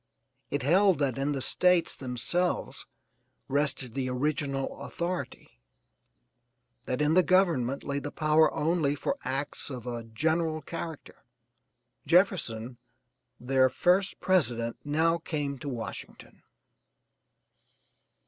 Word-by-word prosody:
It 145 -2 -2
held 185 +5 +4
that 135 -3 -1
in 140 +2 0
the 135 -2 -1
States 180 -2 +3
themselves 135 +8 -1 0.6
rested 135 -3 +1
the 130 0 -2
original 135 +1 -2
authority, 170 - -5 1.2
that 130 +4 -1
in 150 +1 +2
the 185 - +6
government 165 -9 +2
lay 140 0 -2
the 145 +1 -5
power 155 0 +3
only 155 -2 0
for 275 - -3
acts 135 +3 -3
of 125 -4 -7
a 120 -1 -4
general 155 +6 -1
character. 165 -2 -7 0.8
Jefferson, 130 - +1 0.6
their 130 +1 +3
first 180 +7 +1
president, 120 -11 +1
now 160 +3 +1
came 145 -4 -3
to 140 - -5
Washington. 120 -4 -7
145 Hz, 110 wpm, -28 LUFS, 130-165 Hz, 1.2 s, the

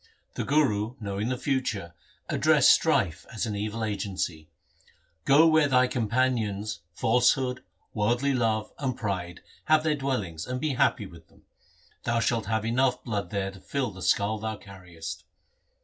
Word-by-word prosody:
The - - -3
Guru 125 -6 +1
knowing 100 +1 -3
the 130 - -1
future 120 -9 -2 0.3
addressed - - +5
Strife, 85 -1 +2
as 115 -2 -2
an 105 -2 -3
evil 110 +2 -3
agency. 95 -6 -3 0.4
' 80 -1 -35
Go 145 +4 +6
where 155 -2 +5
thy 130 -2 +4
companions 110 -5 -1
falsehood, 125 +6 +2 0.3
worldly 120 +6 +1
love, 110 -3 0
and 130 -3 -2
pride, 90 -5 -4 0.2
have 155 0 +4
their 155 -1 +1
dwel 135 -4 -1
lings, 80 -4 -7
and 125 0 -3
be 150 0 -1
happy 120 -3 +2
with 85 -3 -14
them. - - -25 0.6
Thou 120 0 0
shalt 115 -2 0
have 110 0 -1
enough 125 +2 +1
blood 100 -6 -3
there 95 0 -2
to 95 - -13
fill 130 +2 -2
the 95 -1 -11
skull 100 +4 +1
thou 110 0 -4
carriest.' 90 -5 -9
110 Hz, 160 wpm, -27 LUFS, 100-130 Hz, 0.6 s, Go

